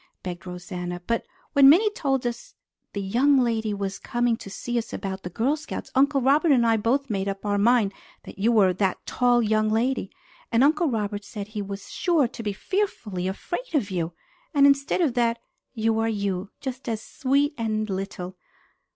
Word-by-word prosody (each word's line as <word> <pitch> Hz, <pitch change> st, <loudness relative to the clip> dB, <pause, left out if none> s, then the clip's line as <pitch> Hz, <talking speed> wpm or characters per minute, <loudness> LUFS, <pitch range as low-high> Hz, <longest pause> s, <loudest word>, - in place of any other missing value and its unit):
begged 180 Hz, 0 st, -6 dB
Rosanna, 180 Hz, 0 st, -5 dB
"but 230 Hz, 0 st, -1 dB, 0.3 s
when 280 Hz, -2 st, +8 dB
Minnie 410 Hz, +8 st, +6 dB
told 270 Hz, -10 st, -1 dB
us 240 Hz, 0 st, -5 dB, 0.4 s
the 200 Hz, -, -3 dB
young 260 Hz, +9 st, +3 dB
lady 225 Hz, -4 st, +1 dB
was 195 Hz, -1 st, -3 dB
coming 240 Hz, -1 st, 0 dB
to 195 Hz, -, -10 dB
see 240 Hz, +5 st, -6 dB
me -, -, +3 dB
about 195 Hz, -1 st, -4 dB
the 180 Hz, -, -6 dB
Girl 240 Hz, -, +1 dB
Scouts, 310 Hz, -, -7 dB
Uncle 275 Hz, +1 st, +3 dB
Robert 290 Hz, +5 st, +4 dB
and 245 Hz, -4 st, +4 dB
I 225 Hz, -1 st, +4 dB
both 245 Hz, +6 st, +1 dB
made 195 Hz, -1 st, -1 dB
up 195 Hz, +1 st, -4 dB
our 205 Hz, 0 st, +1 dB
mind 220 Hz, -2 st, +3 dB, 0.3 s
that -, -, -11 dB
you 225 Hz, +4 st, +3 dB
were 200 Hz, -5 st, +4 dB
that 190 Hz, 0 st, -1 dB
tall 245 Hz, -1 st, +2 dB
young 215 Hz, 0 st, +2 dB
lady. 230 Hz, -1 st, 0 dB, 0.4 s
And 235 Hz, +2 st, +4 dB
Uncle 305 Hz, +3 st, +3 dB
Robert 205 Hz, -3 st, -2 dB
said 205 Hz, -1 st, -7 dB
he 215 Hz, -1 st, -4 dB
was 200 Hz, 0 st, -7 dB
sure 330 Hz, -7 st, +2 dB
to 235 Hz, 0 st, -9 dB
be 210 Hz, -2 st, -2 dB
fearfully 210 Hz, -, -2 dB
afraid 350 Hz, -, -4 dB
of 220 Hz, -9 st, +1 dB
you. 170 Hz, -2 st, -2 dB, 0.4 s
And 280 Hz, -1 st, +6 dB
instead 280 Hz, +4 st, +3 dB
of 300 Hz, -8 st, +2 dB
that, 235 Hz, -1 st, +1 dB, 0.4 s
you 225 Hz, 0 st, +1 dB
are 225 Hz, 0 st, +1 dB
you, 200 Hz, -3 st, -2 dB
just 260 Hz, -2 st, -5 dB
as 225 Hz, -2 st, -1 dB
sweet 280 Hz, +6 st, 0 dB
and 215 Hz, -3 st, -1 dB
little! 190 Hz, -1 st, -5 dB
225 Hz, 190 wpm, -25 LUFS, 200-265 Hz, 0.4 s, when